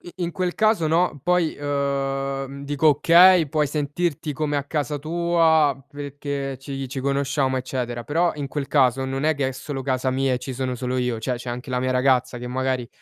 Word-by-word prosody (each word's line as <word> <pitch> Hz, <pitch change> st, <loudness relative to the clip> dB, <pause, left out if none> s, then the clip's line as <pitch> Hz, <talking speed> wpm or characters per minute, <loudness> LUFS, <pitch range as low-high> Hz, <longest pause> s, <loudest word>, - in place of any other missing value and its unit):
in 175 Hz, -2 st, -3 dB
quel 180 Hz, 0 st, -2 dB
caso, 215 Hz, -7 st, +2 dB
no, 165 Hz, -2 st, +1 dB
poi, 180 Hz, -2 st, +1 dB
uhm, 140 Hz, -1 st, -2 dB
dico, 145 Hz, +2 st, +1 dB
okay, 170 Hz, +3 st, +6 dB
puoi 150 Hz, -1 st, +1 dB
sentirti 150 Hz, +1 st, -2 dB
come 150 Hz, +1 st, -1 dB
a 140 Hz, -, -1 dB
casa 150 Hz, 0 st, -2 dB
tua 160 Hz, -2 st, +2 dB
perché, 140 Hz, -1 st, -5 dB
ci 135 Hz, 0 st, -6 dB
ci 135 Hz, +1 st, -5 dB
conosciamo, 140 Hz, -1 st, 0 dB
eccetera, 125 Hz, -2 st, -4 dB
però 170 Hz, +3 st, +1 dB
in 145 Hz, -2 st, -4 dB
quel 140 Hz, 0 st, -4 dB
caso, 135 Hz, -2 st, +3 dB
non 135 Hz, +2 st, -3 dB
è 155 Hz, 0 st, +2 dB
che 140 Hz, -2 st, 0 dB
è -, -, -4 dB
solo 135 Hz, +1 st, -6 dB
casa 130 Hz, -1 st, 0 dB
mia 135 Hz, 0 st, +1 dB
e 125 Hz, -, 0 dB
ci 130 Hz, 0 st, -6 dB
sono 130 Hz, 0 st, -2 dB
solo 125 Hz, +1 st, -3 dB
io, 125 Hz, -2 st, -1 dB
cioè 125 Hz, +3 st, -2 dB
c'è 120 Hz, +1 st, -7 dB
anche 125 Hz, +2 st, -6 dB
la 125 Hz, -1 st, 0 dB
mia 130 Hz, 0 st, 0 dB
ragazza 130 Hz, -1 st, +2 dB
che 125 Hz, -, -6 dB
magari 130 Hz, -1 st, -1 dB
140 Hz, 200 wpm, -23 LUFS, 130-155 Hz, -, okay